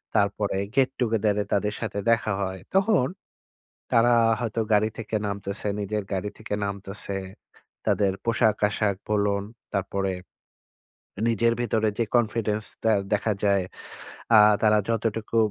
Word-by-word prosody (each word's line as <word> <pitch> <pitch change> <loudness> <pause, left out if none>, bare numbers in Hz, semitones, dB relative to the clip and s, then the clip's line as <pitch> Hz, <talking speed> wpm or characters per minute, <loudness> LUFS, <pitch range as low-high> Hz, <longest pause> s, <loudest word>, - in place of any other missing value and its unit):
তারপরে 100 0 +1 0.2
গেট 130 -1 +4
টুগেদারে 110 -3 +1
তাদের 105 +1 +1
সাথে 105 -2 -3
দেখা 110 -2 +1
হয়। 95 -1 -3 0.2
তখন 195 - +4 0.9
তারা 120 +1 +5 0.3
হয়তো 115 -1 -1
গাড়ি 105 +1 +3
থেকে 110 -1 -4
নামতেছে, 100 +1 -4
নিজের 105 +1 -2
গাড়ি 95 +2 -2
থেকে 110 -1 -6
নামতেছে। 100 0 -5 0.7
তাদের 100 -2 +2
পোশাক-আশাক 105 -3 +1
বলুন, 100 -1 +1 0.3
তারপরে 95 0 -1 1.2
নিজের 115 +1 +2
ভিতরে 110 -2 +1
যে 115 - +2
কনফিডেন্সটা 110 -1 0 0.2
দেখা 110 +1 +1
যায়। 100 -2 +3 0.7
আ - - +9 0.2
তারা 105 -1 +5
যতটুকু, 115 0 -1
105 Hz, 115 wpm, -25 LUFS, 100-115 Hz, 1.2 s, আ